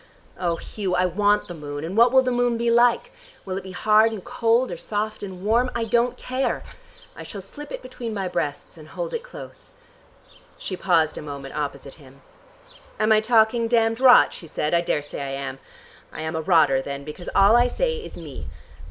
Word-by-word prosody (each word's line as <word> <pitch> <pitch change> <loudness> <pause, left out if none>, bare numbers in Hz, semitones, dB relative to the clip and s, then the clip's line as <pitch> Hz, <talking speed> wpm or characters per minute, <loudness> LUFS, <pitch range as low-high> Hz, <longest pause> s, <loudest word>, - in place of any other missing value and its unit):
Oh, 175 -2 0
Hugh, 190 +1 -3
I 180 +1 +2
want 205 +3 +2
the 175 - -7
moon, 145 -2 -6
and 170 +4 -5
what 235 +2 +6
will 260 0 +5
the 255 - 0
moon 245 -1 +1
be 235 0 +1
like? 235 0 +3 0.3
Will 185 -1 -4
it 195 - -3
be 190 - -9
hard 215 +4 +4
and 210 -4 -6
cold 240 +1 +1
or 175 - -5
soft 215 +4 -3
and 190 -1 -7
warm? 235 +4 +3
I 235 - 0
don't 235 +2 +1
care. 255 +1 -2 0.5
I - - -9
shall 200 - -7
slip 290 +10 -8
it - - -6
between 250 -2 -6
my 195 -3 -2
breasts 160 -2 -4
and 155 - -12
hold - - -5
it 470 - -2
close." - - -12 0.8
She 185 - -5
paused 165 -4 +1
a - - -7
moment 140 -2 -8
opposite 140 -2 -4
him. 135 0 -17 0.8
"Am 215 +1 +2
I 215 - +6
talking 230 +1 +3
damned 225 -1 +2
rot?" 255 -1 +7
she 165 - -10
asked. - - -18 0.2
"I 170 - +4
daresay 145 -4 -3
I - - -3
am. 135 -1 -5 0.5
I - - -7
am 160 +1 -3
a 160 - -1
rotter 155 -6 +4
then, 140 +1 -6
because 150 +4 -8
all 200 +3 +6
I 240 +1 +5
say 475 - -1
is 455 - -9
me. - - -8
205 Hz, 205 wpm, -23 LUFS, 160-235 Hz, 0.8 s, rot